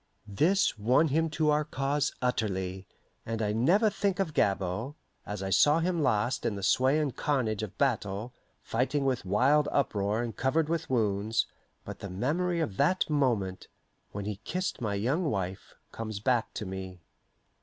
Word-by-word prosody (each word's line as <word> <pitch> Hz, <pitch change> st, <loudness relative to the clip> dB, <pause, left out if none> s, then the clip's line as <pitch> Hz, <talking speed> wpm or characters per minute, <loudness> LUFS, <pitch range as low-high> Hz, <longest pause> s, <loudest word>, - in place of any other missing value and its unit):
This 155 Hz, -, +2 dB
won 125 Hz, +9 st, +3 dB
him 160 Hz, +3 st, +1 dB
to 155 Hz, 0 st, +1 dB
our 150 Hz, +1 st, +2 dB
cause 140 Hz, 0 st, -1 dB
utterly, 95 Hz, -6 st, -1 dB, 0.4 s
and 115 Hz, 0 st, -4 dB
I 105 Hz, -1 st, 0 dB
never 175 Hz, -, +3 dB
think 200 Hz, -1 st, -1 dB
of 175 Hz, -6 st, -1 dB
Gabord, 100 Hz, +7 st, 0 dB, 0.3 s
as 105 Hz, -1 st, -4 dB
I 95 Hz, -, -3 dB
saw 145 Hz, +9 st, +5 dB
him 170 Hz, 0 st, 0 dB
last 125 Hz, -1 st, +1 dB
in 105 Hz, -, -1 dB
the 100 Hz, -, -6 dB
sway 130 Hz, +8 st, +3 dB
and 145 Hz, -4 st, -1 dB
carnage 115 Hz, -8 st, 0 dB
of 105 Hz, -1 st, -6 dB
battle, 110 Hz, -3 st, -1 dB, 0.3 s
fighting 135 Hz, +4 st, 0 dB
with 130 Hz, -6 st, 0 dB
wild 135 Hz, +10 st, +3 dB
uproar 105 Hz, -4 st, 0 dB
and 115 Hz, -2 st, -5 dB
covered 150 Hz, +4 st, +1 dB
with 165 Hz, -1 st, -2 dB
wounds, 110 Hz, -2 st, +1 dB, 0.4 s
but -, -, -7 dB
the 100 Hz, -, -6 dB
memory 165 Hz, -, 0 dB
of 105 Hz, -11 st, -3 dB
that 165 Hz, +3 st, +2 dB
moment, 115 Hz, -10 st, 0 dB, 0.4 s
when 100 Hz, 0 st, -5 dB
he 105 Hz, -2 st, -3 dB
kissed 180 Hz, -, -3 dB
my 105 Hz, -3 st, -1 dB
young 130 Hz, -, 0 dB
wife, 95 Hz, -4 st, -4 dB, 0.2 s
comes 110 Hz, -2 st, -5 dB
back 120 Hz, +1 st, +1 dB
to 105 Hz, -, -4 dB
me. 95 Hz, -1 st, -6 dB
120 Hz, 165 wpm, -29 LUFS, 100-150 Hz, 0.4 s, saw